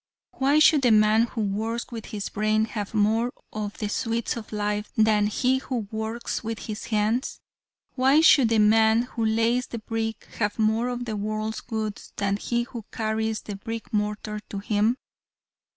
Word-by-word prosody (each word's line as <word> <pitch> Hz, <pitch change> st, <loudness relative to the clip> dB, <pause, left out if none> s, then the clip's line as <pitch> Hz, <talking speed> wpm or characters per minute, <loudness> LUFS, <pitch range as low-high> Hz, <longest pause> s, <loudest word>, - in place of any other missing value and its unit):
Why 275 Hz, +3 st, +2 dB
should 305 Hz, -1 st, +6 dB
the 250 Hz, -, +4 dB
man 215 Hz, +1 st, +5 dB
who 230 Hz, -, -4 dB
works 220 Hz, +4 st, -2 dB
with 225 Hz, -2 st, -6 dB
his 205 Hz, -2 st, -4 dB
brain 215 Hz, +1 st, +1 dB
have 210 Hz, -1 st, -5 dB
more 220 Hz, +3 st, +2 dB, 0.2 s
of 210 Hz, -1 st, -4 dB
the 210 Hz, -, -2 dB
sweets 230 Hz, +2 st, -1 dB
of 230 Hz, -3 st, -8 dB
life 210 Hz, 0 st, -2 dB
than 215 Hz, -1 st, +4 dB
he 255 Hz, +5 st, +1 dB
who 245 Hz, -6 st, -4 dB
works 220 Hz, +2 st, -3 dB
with 225 Hz, 0 st, -3 dB
his 215 Hz, -1 st, -5 dB
hands? 220 Hz, +3 st, 0 dB, 0.5 s
Why 270 Hz, +3 st, +4 dB
should 275 Hz, -7 st, +6 dB
the 225 Hz, -, +2 dB
man 220 Hz, +2 st, +5 dB
who 240 Hz, -2 st, -4 dB
lays 230 Hz, +3 st, +2 dB
the 235 Hz, -, -6 dB
brick 225 Hz, 0 st, -4 dB
have 205 Hz, -2 st, 0 dB
more 220 Hz, +2 st, +2 dB
of 245 Hz, 0 st, -3 dB
the 220 Hz, -2 st, -3 dB
world's 215 Hz, +1 st, -3 dB
goods 220 Hz, -3 st, -5 dB
than 200 Hz, 0 st, 0 dB
he 240 Hz, +3 st, -1 dB
who 235 Hz, -2 st, -8 dB
carries 220 Hz, 0 st, -1 dB
the 205 Hz, -, -6 dB
brick 225 Hz, +3 st, -7 dB
mortar 210 Hz, 0 st, -2 dB
to 200 Hz, -, -5 dB
him? 210 Hz, +4 st, +1 dB
220 Hz, 175 wpm, -25 LUFS, 210-235 Hz, 0.5 s, should